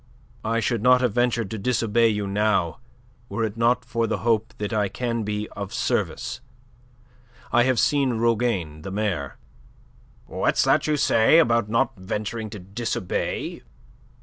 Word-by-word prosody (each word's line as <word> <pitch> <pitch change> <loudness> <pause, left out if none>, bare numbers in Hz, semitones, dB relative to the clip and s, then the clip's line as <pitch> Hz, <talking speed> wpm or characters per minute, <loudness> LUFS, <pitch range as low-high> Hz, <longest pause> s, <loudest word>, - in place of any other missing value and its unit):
"I 115 +1 0
should 115 +1 0
not 125 +1 +5
have 125 -5 +1
ventured 120 -3 0
to 110 - -4
disobey 115 0 +2
you 105 -2 -1
now 100 -5 0 0.5
were 115 - -2
it 110 -1 -2
not 120 +2 +2
for 115 0 -1
the - - -1
hope 115 +1 +1
that 105 0 -3
I 105 -2 +1
can 115 0 -2
be 105 0 -3
of 100 -2 -7
service. 120 - -2 1.1
I 120 0 +4
have 130 -1 +2
seen 135 -5 +2
Rougane, 110 -9 0
the 90 - -6
mayor..." 95 - -2 0.9
"What's - - +1
that - - +2
you 150 -1 +1
say 115 +2 +4
about 115 -8 +3
not 115 +4 +1
venturing 105 +4 -4
to 105 - -8
disobey?" 100 0 -3
115 Hz, 150 wpm, -24 LUFS, 105-120 Hz, 1.1 s, not